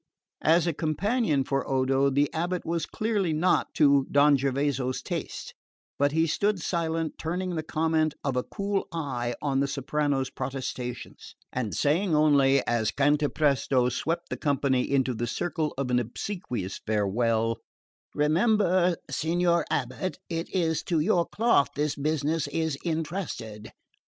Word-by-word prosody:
As 165 +2 +4
a 170 - 0
companion 160 - 0
for 135 0 -2
Odo 135 +1 +2
the 140 +2 +2
abate 175 +2 -2
was 165 -1 -1
clearly 210 -6 -1
not 165 +4 +2
to 140 -3 +4
Don 145 +1 +5
Gervaso's 135 -1 0
taste; - - -5 0.5
but 145 0 +3
he 160 +2 +2
stood 200 +5 0
silent, 165 -2 -2
turning 180 +3 -2
the 160 - -1
comment 155 -1 0
of 135 -3 -1
a 125 - +2
cool 200 +7 -3
eye 130 -8 -3
on 135 -2 +1
the 140 - +1
soprano's 140 -1 -1
protestations, 130 -2 -6 0.2
and 125 -5 -2
saying 165 +4 +2
only, 140 -3 +4
as 115 -3 +1
Cantapresto 145 -3 +2
swept 165 +7 -2
the - - -3
company 135 -3 +1
into 130 -2 +2
the 120 +1 -3
circle 160 +4 -2
of 135 -2 -2
an 125 - +3
obsequious 120 - -4
farewell: 110 +2 0 0.6
"Remember, 180 +3 +3 0.2
signor 170 +5 +1
abate, 135 +8 -2
it 165 +1 -3
is 160 -4 0
to 165 -3 +1
your 170 +1 +2
cloth 225 -10 +2
this 150 0 0
business 155 +1 -1
is 160 0 -1
entrusted." 160 - -4
150 Hz, 140 wpm, -27 LUFS, 135-170 Hz, 0.6 s, Don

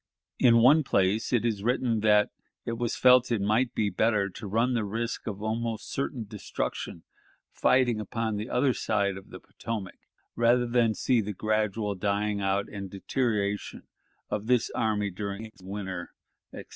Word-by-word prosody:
In 115 -2 +6
one 150 +5 +6
place 100 -3 +1
it 120 -2 +2
is 110 -4 0
written 120 0 +1
that 105 -1 +4 0.3
"it - - -2
was 120 -1 -1
felt 125 -1 +5
it 115 - +2
might 110 +5 +1
be 105 -2 +1
better 105 -3 +1
to 105 +3 -8
run 115 +5 +1
the 115 -3 0
risk 115 +4 -3
of 105 -1 -5
almost 115 0 -3
certain 135 -4 -3
destruction 100 -4 -5 0.5
fighting 125 -4 +2
upon 110 +1 -2
the 105 +3 -4
other 130 +1 +2
side 100 -4 0
of 95 - -11
the - - -9
Potomac, 110 -5 -6 0.4
rather 120 +1 +3
than 120 -2 +2
see 125 -3 +2
the 105 0 -4
gradual 110 0 0
dying 100 +1 -1
out 95 +1 0
and 100 -2 -7
deterioration 105 0 -2 0.4
of 105 +1 -3
this 125 -2 +2
army 105 -2 0
during 100 +3 -5
a 110 - -11
winter," 95 -2 -6 0.4
etc. - - -9
110 Hz, 165 wpm, -28 LUFS, 100-120 Hz, 0.5 s, In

